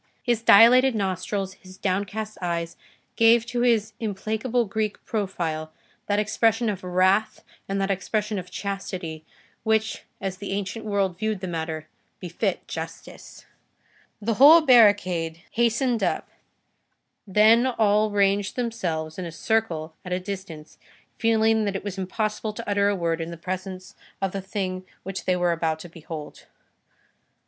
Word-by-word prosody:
His 240 Hz, -3 st, +1 dB
dilated 240 Hz, +4 st, +7 dB
nostrils, 190 Hz, 0 st, -2 dB
his 185 Hz, 0 st, -14 dB
downcast 205 Hz, +3 st, -3 dB
eyes, 170 Hz, -1 st, -2 dB, 0.4 s
gave 230 Hz, 0 st, +5 dB
to 240 Hz, 0 st, -2 dB
his 220 Hz, -3 st, +2 dB
implacable 220 Hz, +3 st, -1 dB
Greek 215 Hz, +1 st, -3 dB
profile 170 Hz, -7 st, -3 dB, 0.4 s
that 205 Hz, -, +1 dB
expression 225 Hz, +2 st, +2 dB
of 190 Hz, -2 st, -7 dB
wrath 185 Hz, +4 st, +2 dB, 0.3 s
and 195 Hz, 0 st, -1 dB
that 195 Hz, 0 st, 0 dB
expression 210 Hz, +2 st, -1 dB
of 180 Hz, 0 st, -9 dB
Chastity 180 Hz, -5 st, -5 dB, 0.4 s
which, 220 Hz, 0 st, 0 dB, 0.2 s
as 190 Hz, -1 st, -4 dB
the 200 Hz, 0 st, -5 dB
ancient 205 Hz, +3 st, -4 dB
world 195 Hz, -4 st, 0 dB
viewed 215 Hz, -2 st, -1 dB
the 185 Hz, -, -5 dB
matter, 160 Hz, -2 st, -4 dB, 0.3 s
befit 175 Hz, -2 st, -3 dB
Justice. -, -, -8 dB, 0.7 s
The 225 Hz, +2 st, -1 dB
whole 295 Hz, +8 st, +8 dB
barricade 185 Hz, -, +4 dB
hastened 235 Hz, +1 st, +1 dB
up, -, -, -1 dB, 1.0 s
then 220 Hz, +5 st, +5 dB
all 215 Hz, -3 st, +2 dB
ranged 200 Hz, -1 st, +1 dB
themselves 180 Hz, -10 st, -3 dB
in 185 Hz, -, -4 dB
a 170 Hz, -, -6 dB
circle 170 Hz, -4 st, -1 dB
at 180 Hz, -, -8 dB
a 180 Hz, -, 0 dB
distance, 185 Hz, -5 st, -8 dB, 0.4 s
feeling 225 Hz, -1 st, +3 dB
that 200 Hz, -1 st, -2 dB
it 195 Hz, -, -3 dB
was 200 Hz, -1 st, -5 dB
impossible 215 Hz, +3 st, -2 dB
to -, -, -8 dB
utter 200 Hz, 0 st, +2 dB
a 205 Hz, -, +1 dB
word 165 Hz, -2 st, -1 dB
in 165 Hz, -, -4 dB
the 170 Hz, -, -7 dB
presence 185 Hz, +1 st, -6 dB, 0.3 s
of 195 Hz, -1 st, -1 dB
the 195 Hz, -, -4 dB
thing 190 Hz, -1 st, -4 dB, 0.2 s
which 195 Hz, 0 st, -5 dB
they 185 Hz, -, +2 dB
were 175 Hz, -1 st, +1 dB
about 165 Hz, -1 st, 0 dB
to 175 Hz, -, -10 dB
behold. 160 Hz, -2 st, -9 dB
200 Hz, 145 wpm, -25 LUFS, 180-220 Hz, 1.0 s, whole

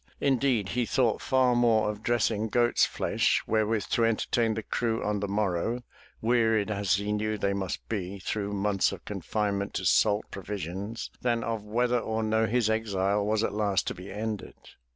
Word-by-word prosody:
Indeed, 130 Hz, -7 st, +1 dB
he 120 Hz, -1 st, 0 dB
thought 120 Hz, -5 st, +1 dB
far 130 Hz, -2 st, +3 dB
more 115 Hz, -3 st, +3 dB
of 105 Hz, 0 st, -10 dB
dressing 110 Hz, -2 st, +1 dB
goat's 120 Hz, +2 st, +3 dB
flesh -, -, +1 dB
wherewith 110 Hz, -1 st, +1 dB
to 115 Hz, -, +2 dB
entertain 115 Hz, 0 st, +1 dB
the 110 Hz, -, -3 dB
crew 115 Hz, +1 st, -1 dB
on 105 Hz, -1 st, 0 dB
the 100 Hz, -, -2 dB
morrow, 105 Hz, +4 st, -1 dB, 0.4 s
wearied 110 Hz, -3 st, +2 dB
as 100 Hz, -2 st, +1 dB
he 100 Hz, +2 st, -2 dB
knew 105 Hz, +1 st, -1 dB
they 100 Hz, -1 st, 0 dB
must 95 Hz, -2 st, -4 dB
be 100 Hz, -3 st, -3 dB
through 100 Hz, +1 st, -3 dB
months 100 Hz, -1 st, +1 dB
of -, -, -9 dB
confinement 100 Hz, -2 st, -2 dB
to 95 Hz, -, -2 dB
salt 105 Hz, +4 st, +3 dB
pro 100 Hz, -, -6 dB
visions, 100 Hz, +3 st, -5 dB
than 120 Hz, -2 st, +1 dB
of 115 Hz, -2 st, -2 dB
whether 120 Hz, +3 st, +1 dB
or 110 Hz, -1 st, -2 dB
no 110 Hz, +1 st, +2 dB
his 120 Hz, 0 st, +1 dB
exile 100 Hz, -2 st, 0 dB
was 105 Hz, +1 st, +1 dB
at -, -, -1 dB
last 105 Hz, -2 st, +1 dB
to -, -, -2 dB
be 90 Hz, +2 st, -10 dB
ended. 105 Hz, 0 st, -4 dB
110 Hz, 180 wpm, -28 LUFS, 100-115 Hz, 0.4 s, far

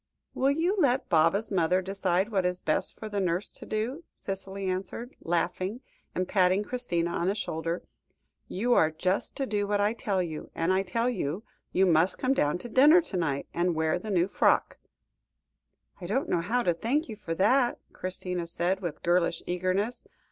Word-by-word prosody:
"Will 270 Hz, -, +2 dB
you 330 Hz, +7 st, +1 dB
let 265 Hz, -5 st, +2 dB
Baba's 170 Hz, +7 st, +3 dB
mother 180 Hz, -1 st, +2 dB
decide 190 Hz, +1 st, 0 dB
what 195 Hz, -4 st, +1 dB
is 180 Hz, 0 st, -1 dB
best 155 Hz, -, 0 dB
for 220 Hz, -, -6 dB
the 205 Hz, -1 st, -2 dB
nurse 180 Hz, +1 st, 0 dB
to -, -, -11 dB
do?" 235 Hz, +9 st, -2 dB
Cicely 195 Hz, 0 st, -5 dB
answered, 195 Hz, +7 st, -4 dB
laughing, 180 Hz, +6 st, -1 dB, 0.3 s
and 185 Hz, 0 st, -1 dB
patting 185 Hz, 0 st, +3 dB
Christina 175 Hz, -9 st, -1 dB
on 170 Hz, -, -1 dB
the 195 Hz, -, +1 dB
shoulder; 165 Hz, -3 st, -3 dB, 0.6 s
"you 240 Hz, +6 st, +1 dB
are 160 Hz, -, +5 dB
just 185 Hz, +5 st, -1 dB
to 275 Hz, -, 0 dB
do 205 Hz, -4 st, -1 dB
what 205 Hz, 0 st, +1 dB
I 205 Hz, +2 st, +2 dB
tell 200 Hz, -4 st, -1 dB
you, 160 Hz, -3 st, -6 dB
and 165 Hz, +3 st, +1 dB
I 190 Hz, -, +3 dB
tell 230 Hz, +6 st, -1 dB
you 195 Hz, -, -2 dB, 0.3 s
you 190 Hz, -, +3 dB
must 175 Hz, +1 st, +3 dB
come 260 Hz, +1 st, +1 dB
down 150 Hz, -, +1 dB
to 180 Hz, -, -8 dB
dinner 290 Hz, +8 st, +7 dB
to 205 Hz, -, -5 dB
night, 145 Hz, -5 st, -1 dB
and 175 Hz, 0 st, +1 dB
wear 160 Hz, 0 st, +1 dB
the 220 Hz, -, -7 dB
new 180 Hz, -3 st, +2 dB
frock." -, -, +2 dB, 1.2 s
"I 175 Hz, -, -5 dB
don't 260 Hz, +9 st, 0 dB
know 170 Hz, -, +1 dB
how 235 Hz, +8 st, 0 dB
to 175 Hz, -, +2 dB
thank 245 Hz, -, 0 dB
you 220 Hz, -, -6 dB
for 170 Hz, -6 st, -5 dB
that," 240 Hz, +7 st, +3 dB, 0.2 s
Christina 180 Hz, -1 st, -4 dB
said, 175 Hz, +3 st, -1 dB
with 170 Hz, -5 st, -5 dB
girlish 175 Hz, -1 st, +2 dB
eagerness. 185 Hz, +6 st, -1 dB
190 Hz, 185 wpm, -28 LUFS, 175-220 Hz, 1.2 s, dinner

